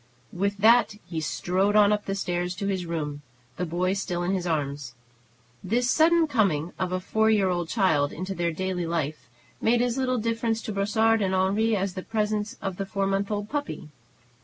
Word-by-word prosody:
With 200 +3 -1
that 225 +1 +5
he 165 -2 -4
strode 185 +6 0
on 210 -1 +6
up 210 0 -2
the 195 - -2
stairs 180 -2 -2
to 200 - -4
his 190 -3 -2
room, 150 -3 -3 0.4
the 180 - -2
boy 180 +3 0
still 180 -3 -2
in 175 - 0
his 180 -2 -2
arms. 140 -5 -2 0.7
This 245 +6 +1
sudden 335 +1 +4
coming 195 - 0
of 185 -1 -1
a 185 - 0
four 220 +4 +1
year 205 -4 +3
old 175 -2 -2
child 160 -10 +2
into 185 +4 -5
their 170 -2 -1
daily 180 0 -2
life 155 -5 -3 0.3
made 235 +1 +3
as 245 +1 -1
little 255 -1 +1
difference 230 0 -1
to 215 - -4
Brossard 220 +3 +2
and 190 -1 +1
Henri 205 +4 +2
as 195 -1 -1
the 185 - -5
presence 210 0 -2
of 190 -2 -3
the 195 - -3
four 195 0 -1
months 195 +1 0
old 205 -1 -2
puppy. 285 - -4
195 Hz, 195 wpm, -26 LUFS, 175-215 Hz, 0.7 s, on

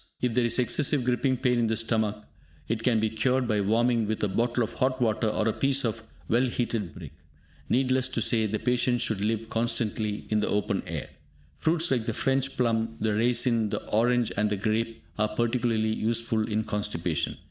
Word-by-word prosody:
If 125 -2 0
there 125 - +2
is 120 - +2
excessive 135 +2 +2
griping 125 +1 +1
pain 125 -1 +1
in 115 - +2
the 110 0 0
stomach, 110 -2 -1 0.4
it 115 0 -1
can 115 -1 +2
be 110 - +1
cured 125 +3 +1
by 105 -2 +1
warming 115 +2 +2
with 110 0 -2
a - - +3
bottle 120 +4 0
of 110 - -4
hot 130 0 0
water 110 -2 +1
or 110 +1 0
a 110 - +2
piece 140 -1 +1
of 115 0 -2 0.3
well 120 +2 +3
heated 115 -6 -2
brick. - - -9 0.6
Needless 130 0 +2
to 130 - -3
say, 110 -3 +2
the 110 +1 -1
patient 125 +1 +1
should 105 -3 -1
live 110 +1 -1
constantly 115 -2 -2
in 110 - +2
the 105 - 0
open 105 -1 0
air. - - -5 0.5
Fruits 165 0 +1
like 120 -4 0
the 115 - -1
French 135 0 0
plum, 115 -2 0
the 110 -1 0
raisin, 115 0 +2
the - - -3
orange 120 +2 +2
and 105 +1 +2
the 105 - -1
grape, 110 +2 -2 0.2
are 110 - +3
particularly 115 -2 +1
useful 115 -1 0
in 110 0 0
constipation. 105 -6 -2
115 Hz, 195 wpm, -27 LUFS, 110-125 Hz, 0.6 s, a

